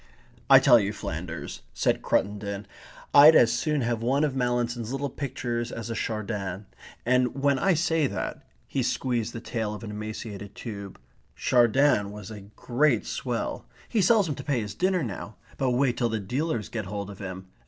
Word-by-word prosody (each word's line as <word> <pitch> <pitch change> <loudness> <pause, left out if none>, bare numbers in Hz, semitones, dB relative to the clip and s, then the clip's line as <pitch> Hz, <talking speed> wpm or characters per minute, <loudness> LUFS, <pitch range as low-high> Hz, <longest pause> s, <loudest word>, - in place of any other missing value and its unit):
"I 135 - +10
tell 130 -3 +7
you, 100 0 -1
Flanders," 80 -3 -6
said 65 - +1
Cruttendon, 100 0 -1 0.5
"I'd 150 +3 +9
as 115 -4 +6
soon 150 +4 0
have 115 -1 -1
one 135 +5 +2
of 145 -3 0
Mallinson's 120 -2 -1
little 135 0 -2
pictures 120 -4 -3
as 115 0 -5
a - - -3
Chardin. 105 -4 -3 0.4
And 125 0 +2
when 140 -1 +3
I 195 -2 +3
say 160 -2 +2
that 100 -5 -4
..." - - -37
he - - -1
squeezed 120 -3 -1
the 115 - -6
tail 110 -2 -3
of 105 - -9
an 105 - -6
emaciated 105 -1 -6
tube... 100 -4 -7 0.4
"Chardin 120 -3 +3
was 105 0 -9
a 105 -2 -8
great 125 -1 +1
swell.... - - -3 0.2
He 220 - +2
sells 205 0 +4
'em 150 - -1
to - - -8
pay 140 -6 0
his 105 -1 -5
dinner 185 -2 +1
now. 105 -2 -6 0.2
But 135 - +2
wait 125 -1 +2
till 120 -2 +1
the 110 -1 -1
dealers 125 - -2
get 110 -3 -4
hold 100 +1 -5
of 100 - -12
him. 95 -1 -7
120 Hz, 185 wpm, -27 LUFS, 105-135 Hz, 0.5 s, I